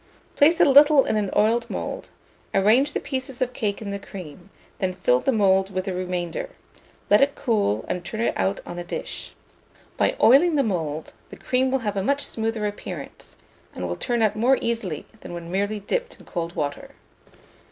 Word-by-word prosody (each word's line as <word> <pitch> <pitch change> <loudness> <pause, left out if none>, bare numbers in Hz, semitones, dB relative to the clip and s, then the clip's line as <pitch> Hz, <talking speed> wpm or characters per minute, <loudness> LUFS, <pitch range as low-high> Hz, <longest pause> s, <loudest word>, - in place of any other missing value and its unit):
Place 325 +4 +4
a 350 - +7
little 285 0 +7
in - - 0
an 210 -2 0
oiled 225 +3 +2
mould; - - -5 0.5
arrange 230 +9 +4
the - - 0
pieces 260 -2 -5
of 255 -1 -1
cake 210 -2 -2
in 200 - -5
the 200 - -4
cream; 185 -2 -10 0.3
then 185 -1 -1
fill 125 -9 +2
the 270 - +1
mould 195 -3 +3
with 185 0 -2
the 190 - -2
remainder; 180 - -3 0.6
let 205 - +7
it 280 0 +3
cool, 210 - 0
and 180 - -3
turn 215 +5 -6
it 235 - +1
out 95 +1 0
on 175 - -6
a - - -4
dish. 175 - -6 0.6
By - - +2
oiling 300 +7 +6
the 280 - +3
mould, 160 - -3 0.2
the - - -10
cream 260 +1 +1
will 260 -3 -1
have 205 -1 -1
a - - +1
much 280 +6 +1
smoother 225 -1 -2
appearance, 205 0 -7 0.4
and - - -3
will - - -3
turn 240 -2 0
out 215 - +2
more 250 +5 +3
easily 225 -10 -3
than 175 - -8
when 170 0 -7
merely 205 +2 -1
dipped 485 - -3
in - - -16
cold 170 -1 -4
water. 145 -1 -4
210 Hz, 195 wpm, -24 LUFS, 185-255 Hz, 0.6 s, a